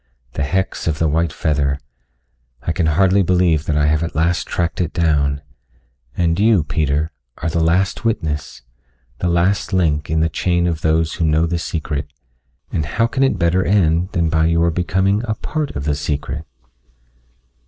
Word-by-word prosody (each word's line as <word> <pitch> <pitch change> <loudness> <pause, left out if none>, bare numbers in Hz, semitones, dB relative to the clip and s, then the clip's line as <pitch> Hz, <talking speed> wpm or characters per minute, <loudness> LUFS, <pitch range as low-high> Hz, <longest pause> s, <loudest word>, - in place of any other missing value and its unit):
The - - -3
hex 95 +7 -1
of 80 -2 0
the 80 - +1
white 80 +1 +1
feather 70 -3 0 0.9
I - - -1
can 85 -1 0
hardly 95 +5 +3
believe 90 -4 +2
that 75 - +1
I 75 - +3
have 75 +1 +2
at 85 - -4
last 85 +3 +1
tracked 85 +1 -1
it 85 - -2
down. 75 -4 +1 0.7
And 85 0 +1
you, 105 -5 +4
Peter, 75 +1 0 0.3
are 85 - -2
the 80 +1 +1
last 90 +4 +1
witness, 80 - -2 0.6
the 90 - 0
last 95 +4 +1
link 80 -5 +1
in 80 +1 +1
the 80 - +3
chain 85 +1 0
of 85 -2 -1
those 80 0 +1
who 85 - -2
know 80 +1 +3
the 85 +1 -1
secret, 75 -3 -3 0.6
and 80 - -1
how 110 +10 0
can 130 +3 -2
it 135 -7 +3
better 90 +1 +2
end 90 -2 +2
than 85 -1 +1
by 80 0 +2
your 85 0 +2
becoming 95 +4 +1
a 110 - -1
part 150 +5 -4
of 70 - -3
the 75 0 0
secret?" 75 +1 -3
85 Hz, 175 wpm, -19 LUFS, 75-90 Hz, 0.9 s, you